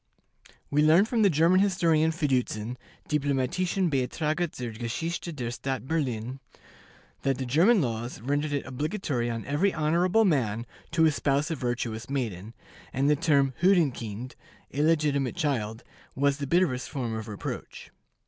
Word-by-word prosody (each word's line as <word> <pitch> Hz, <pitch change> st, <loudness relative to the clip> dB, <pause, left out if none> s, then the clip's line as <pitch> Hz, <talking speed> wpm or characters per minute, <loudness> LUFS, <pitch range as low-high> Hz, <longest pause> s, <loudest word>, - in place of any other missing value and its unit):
We 145 Hz, +1 st, +3 dB
learn 160 Hz, +6 st, +6 dB
from 230 Hz, 0 st, 0 dB
the 205 Hz, -, +6 dB
German 165 Hz, +3 st, +4 dB
historian 170 Hz, -5 st, +3 dB
Fiducin 125 Hz, -7 st, -1 dB, 0.3 s
("Diplomatischen 150 Hz, +6 st, 0 dB
Beitrage 155 Hz, +5 st, 0 dB
zur 120 Hz, -2 st, -4 dB
Geschichte 160 Hz, +10 st, -3 dB
der 125 Hz, -6 st, -4 dB
Stadt 130 Hz, +1 st, -4 dB
Berlin"), 130 Hz, -5 st, -2 dB, 0.8 s
that 135 Hz, -2 st, 0 dB
the 130 Hz, -, -3 dB
German 175 Hz, -, +4 dB
laws 120 Hz, 0 st, -3 dB
rendered 145 Hz, +5 st, -1 dB
it 140 Hz, -1 st, -2 dB
obligatory 130 Hz, -, -2 dB
on 115 Hz, -1 st, -4 dB
every 150 Hz, +9 st, +1 dB
honorable 175 Hz, +8 st, +2 dB
man 120 Hz, -, +1 dB, 0.2 s
to 160 Hz, 0 st, +3 dB
espouse 145 Hz, 0 st, +1 dB
a -, -, 0 dB
virtuous 120 Hz, -3 st, -3 dB
maiden, 115 Hz, -6 st, -3 dB, 0.4 s
and 140 Hz, +3 st, +2 dB
the -, -, +5 dB
term 140 Hz, -3 st, +2 dB
"hurenkind" 130 Hz, -, +1 dB, 0.4 s
(illegitimate 145 Hz, -3 st, +1 dB
child) 115 Hz, -6 st, -2 dB, 0.3 s
was 140 Hz, +1 st, +2 dB
the 140 Hz, -2 st, -4 dB
bitterest 135 Hz, -6 st, +1 dB
form 120 Hz, -5 st, -3 dB
of 110 Hz, 0 st, -5 dB
reproach. 105 Hz, -2 st, -7 dB
140 Hz, 140 wpm, -27 LUFS, 125-160 Hz, 0.8 s, learn